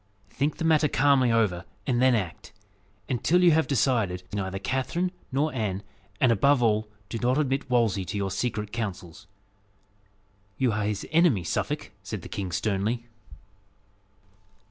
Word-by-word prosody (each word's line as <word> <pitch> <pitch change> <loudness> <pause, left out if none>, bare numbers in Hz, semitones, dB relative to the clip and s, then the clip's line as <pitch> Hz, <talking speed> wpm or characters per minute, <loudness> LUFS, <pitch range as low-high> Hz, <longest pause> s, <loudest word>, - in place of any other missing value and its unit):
Think 145 +2 -1
the 165 - -2
matter 155 -2 +4
calmly 135 -3 +3
over, 105 -6 +1 0.2
and 125 -2 +1
then 130 -1 +5
act. 95 -7 -4 0.6
And 125 -4 -2
till 180 +2 +4
you 175 - +7
have 160 0 +3
decided, 115 -9 +1
see - - -30
neither 95 -1 -2
Catherine 135 - -1 0.2
nor 145 +4 0
Anne; 105 -5 -2 0.4
and, 125 - +4
above 130 +4 +3
all, 110 -1 +2 0.2
do 115 +3 -4
not 125 +3 +1
admit 135 -2 0
Wolsey 115 -6 +2
to 105 +3 -4
your 100 -1 -2
secret 105 0 -2
counsels." 95 -8 -5 1.3
"You 130 -3 +2
are 105 -1 -1
his 105 -1 -2
enemy, 155 - +4
Suffolk," 80 - -2
said - - -6
the - - -9
king 95 -3 -4
sternly. 110 +6 -1
115 Hz, 155 wpm, -26 LUFS, 100-135 Hz, 1.3 s, you